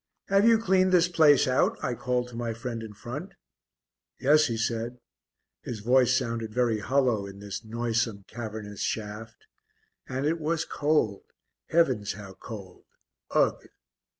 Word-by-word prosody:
"Have 200 +3 +5
you 230 -1 +7
cleaned 190 -3 +3
this 180 -1 +5
place 155 -6 +5
out?" 130 0 +2
I 125 - 0
called 125 +1 -1
to 120 - -11
my 115 -1 -3
friend 115 0 -5
in 110 -1 -7
front. 140 - -7 0.9
"Yes," 150 +3 +5
he 115 -2 -2
said. 115 +1 -2 0.6
His 115 -4 -6
voice 125 +2 +4
sounded 115 -4 -3
very 115 -2 +1
hollow 120 -3 +1
in 100 0 -10
this 100 +1 -6
noisome, 115 -2 -1
cavernous 110 -3 -7
shaft. 110 +1 -4 0.6
And 130 +2 -2
it 165 +2 +1
was 160 +1 -1
cold 145 -9 +1 0.5
heavens 130 -12 +2
how 100 -2 -10
cold! 95 -2 -10 0.4
Ugh! - - +1
120 Hz, 145 wpm, -27 LUFS, 110-145 Hz, 0.9 s, you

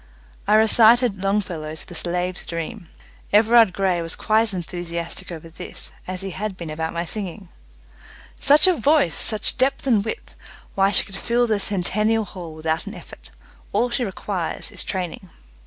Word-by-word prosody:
I 210 - +4
recited 220 -1 +5
Longfellow's 180 -6 -2
"The - - -11
Slave's 180 +1 -1
Dream". 170 +2 -6 0.4
Everard 225 0 +5
Grey 185 -2 0
was 165 -1 -3
quite 220 +1 +2
as 225 -3 +1
enthusiastic 175 +1 -5
over 165 -1 -8
this 180 +2 -6 0.2
as 185 0 -5
he 195 0 -5
had 195 +1 -5
been 170 -3 -7
about 160 +1 -3
my 170 +1 -3
singing. 195 -1 -5 0.9
"Such 290 +2 +6
a 370 - +5
voice! 285 - +2
Such 215 +3 +2
depth 265 +2 +1
and 225 -7 +3
width! 220 - -6 0.4
Why, 195 0 +3
she 200 - +3
could 195 - -7
fill 240 +4 +1
the 215 -3 0
Centennial 210 +3 0
Hall 175 -5 -9
without 160 +1 -2
an - - -7
effort. - - -12 0.4
All 245 0 +1
she 245 +1 0
requires 190 -4 -4
is - - +1
training." 185 0 -5
195 Hz, 165 wpm, -22 LUFS, 175-220 Hz, 0.9 s, Such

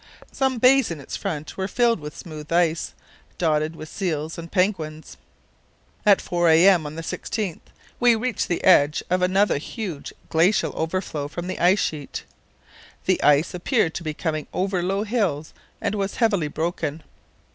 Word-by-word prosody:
Some 265 -2 0
bays 255 +1 +5
in 165 -3 -5
its 140 - -7
front 155 -6 -5
were 190 0 -1
filled 235 0 +2
with 150 0 -8
smooth 155 -2 -9
ice, 170 -2 +1 0.4
dotted 155 -1 +1
with 155 - -8
seals 160 -4 -3
and 170 0 -9
penguins. 165 -5 -1 0.9
At 200 -2 +7
4 175 -1 +1
a.m. 165 0 +5
on 150 - -8
the 165 - -6
16th 195 +1 -3 0.4
we 240 -1 +5
reached 225 -1 -1
the 175 - -2
edge 150 -5 +5
of 180 0 +2
another 190 -2 +2
huge 175 - -6 0.2
glacial 170 +6 +2
overflow 160 -3 -2
from 175 +4 -6
the 185 - -4
ice 180 +3 +5
sheet. 150 -3 -4 0.8
The - - +2
ice 150 +5 +4
appeared 180 -1 +1
to 175 - -5
be 155 -2 -4
coming 155 -2 -3
over 185 0 0
low 195 +3 0
hills 200 - -1 0.3
and - - -1
was 200 -1 -2
heavily 205 -10 +2
broken. 160 0 -3
175 Hz, 160 wpm, -23 LUFS, 155-195 Hz, 0.9 s, At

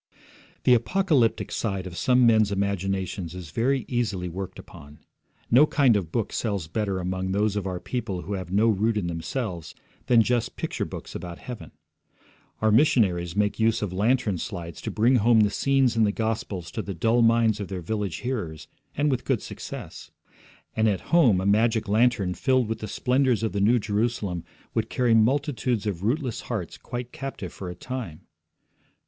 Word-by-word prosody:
The 125 - +6
apocalyptic 135 -1 +2
side 95 -4 -2
of 90 -2 -7
some 125 +5 +3
men's 110 -3 +4
imaginations 95 -2 -2
is 90 -4 -8
very 125 - 0
easily 105 -8 -1
worked 95 +2 -6
upon. 75 +1 -13 0.5
No 135 +6 +7
kind 135 -7 +4
of 90 -6 -2
book 115 +2 -2
sells 100 -7 -2
better 100 +3 -2
among 95 +1 -2
those 105 +1 +1
of 100 -2 -2
our 90 -1 -3
people 110 -7 -4
who 100 - -5
have 95 -3 -5
no 105 +4 +3
root 110 +1 +2
in 100 - -1
themselves 85 - -4 0.3
than 115 -2 +6
just 120 0 0
picture - - -3
books - - -8
about 85 0 -6
heaven. 115 -11 -8 0.9
Our 110 - +4
missionaries 95 - +3
make 105 +1 0
use 115 0 +2
of 95 -3 -3
lantern 105 -1 +1
slides 85 -2 -6
to - - -4
bring 120 +4 +3
home 115 0 +5
the 105 -1 +3
scenes 135 0 +2
in 115 - +3
the 105 - +3
Gospels 105 -6 -3
to 110 - -3
the 100 -3 -6
dull 115 +7 +2
minds 115 -2 +3
of 100 - -4
their 95 -3 -5
village 105 -1 -2
hearers, 105 - -4 0.3
and 145 +1 +2
with 125 -2 -1
good 130 -6 0
success. - - -8 0.7
And 110 0 +3
at 100 - -1
home 125 - +5
a 95 - -2
magic 110 +2 +2
lantern 105 -3 +2
filled 130 +1 +1
with 110 0 -3
the 110 - -5
splendours 125 +2 +1
of 110 - 0
the 100 - -2
New 115 +5 +4
Jerusalem 105 -4 -1 0.3
would 115 0 -1
carry 125 -3 +2
multitudes 125 -1 +1
of 95 -5 -2
rootless 125 +3 -1
hearts 105 -9 -5
quite 120 0 -6
captive 135 -9 -6
for 95 - -7
a 90 - -7
time. 115 -6 -6
110 Hz, 180 wpm, -25 LUFS, 95-120 Hz, 0.9 s, No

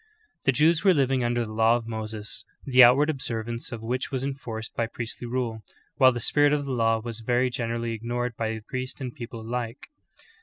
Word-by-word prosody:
The 135 - +5
Jews 155 +5 +3
were 190 -3 +5
living 135 -2 +2
under 120 0 0
the 110 - -8
Law 115 +1 +4
of 120 -1 -3
Moses, 110 +1 -5 0.2
the 130 -2 +7
outward 130 +5 +6
observance 120 -6 -3
of 115 -2 -6
which 125 +3 -2
was 130 -2 -2
enforced 120 -5 -5
by 115 - 0
priestly 120 +1 -6
rule, 120 -2 -2 0.4
while 130 -1 +7
the 120 - -3
spirit 145 +4 +3
of 145 -1 0
the 135 - -4
law 115 -2 +2
was 115 0 -6
very 125 +2 +1
generally 115 -1 -2
ignored 120 +1 -3
by 110 0 -2
priest 130 +2 -4
and 130 -3 -5
people 120 -4 -7
alike. 120 - -5
120 Hz, 195 wpm, -26 LUFS, 115-130 Hz, 0.4 s, the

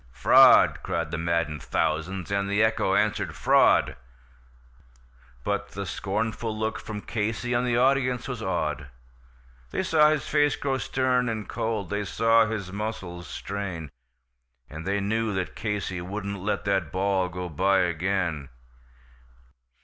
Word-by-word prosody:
"Fraud!" - - +6
cried 85 -3 -3
the - - -2
maddened 85 -2 -1
thousands, 85 +4 -2
and 100 0 0
the 100 +2 +3
echo 110 0 +1
answered, - - 0
"Fraud!" - - +4 1.5
But - - -2
the 100 0 -4
scornful 110 +4 -3
look 110 0 -2
from 105 -1 -6
Casey, 115 +3 -2
and 120 +1 +1
the 120 -1 +1
audience 130 -1 +2
was 125 -4 -5
awed; 75 -7 -2 0.8
They - - -2
saw 155 -4 +4
his 155 -2 -1
face 145 -1 +2
grow 135 -1 -2
stern 125 +1 0
and 110 -2 -4
cold, 110 -5 -3
they 105 0 -1
saw 115 +4 +3
his 100 -4 -4
muscles 95 -5 -5
strain, 95 -7 -5 0.8
And 80 +3 -7
they 100 +1 0
knew 110 +1 -1
that 95 -1 -3
Casey 105 -5 -3
wouldn't 100 +2 -5
let 105 +1 -2
that 95 -5 0
ball 95 -1 0
go 90 0 -5
by 95 +5 +2
again. 85 -4 -1
100 Hz, 140 wpm, -26 LUFS, 90-115 Hz, 1.5 s, Fraud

